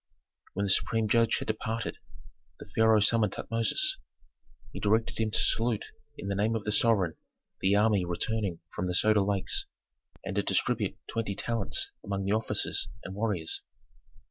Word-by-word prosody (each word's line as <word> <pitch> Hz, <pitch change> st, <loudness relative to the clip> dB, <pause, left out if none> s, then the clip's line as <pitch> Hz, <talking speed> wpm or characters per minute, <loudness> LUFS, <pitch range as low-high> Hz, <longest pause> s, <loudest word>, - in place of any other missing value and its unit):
When 100 Hz, +2 st, -1 dB
the 100 Hz, -, +1 dB
supreme 110 Hz, +3 st, +2 dB
judge 115 Hz, +1 st, +3 dB
had -, -, -5 dB
departed, 110 Hz, +1 st, -3 dB, 0.6 s
the -, -, -10 dB
pharaoh 110 Hz, -1 st, +5 dB
summoned 105 Hz, -1 st, +3 dB
Tutmosis. 380 Hz, -, 0 dB, 0.7 s
He -, -, -5 dB
directed 110 Hz, +3 st, +1 dB
him 110 Hz, -1 st, +1 dB
to 110 Hz, -, +1 dB
salute 115 Hz, -2 st, +1 dB, 0.3 s
in -, -, -6 dB
the 100 Hz, -, 0 dB
name 105 Hz, +3 st, +1 dB
of 110 Hz, -, -2 dB
the 105 Hz, -, -1 dB
sovereign 105 Hz, -7 st, +2 dB, 0.4 s
the 95 Hz, +1 st, +3 dB
army 105 Hz, -2 st, +3 dB
returning 90 Hz, +1 st, -2 dB
from 90 Hz, -, -2 dB
the 90 Hz, -, -1 dB
Soda 105 Hz, +2 st, +4 dB
Lakes, 100 Hz, 0 st, 0 dB, 0.6 s
and -, -, -4 dB
to -, -, +4 dB
distribute -, -, 0 dB
twenty 110 Hz, -3 st, -3 dB
talents 115 Hz, +1 st, -1 dB
among 100 Hz, -1 st, -3 dB
the 100 Hz, -, +1 dB
officers 110 Hz, +1 st, 0 dB
and 95 Hz, -, -7 dB
warriors. 100 Hz, -6 st, -1 dB
105 Hz, 160 wpm, -29 LUFS, 100-115 Hz, 0.7 s, pharaoh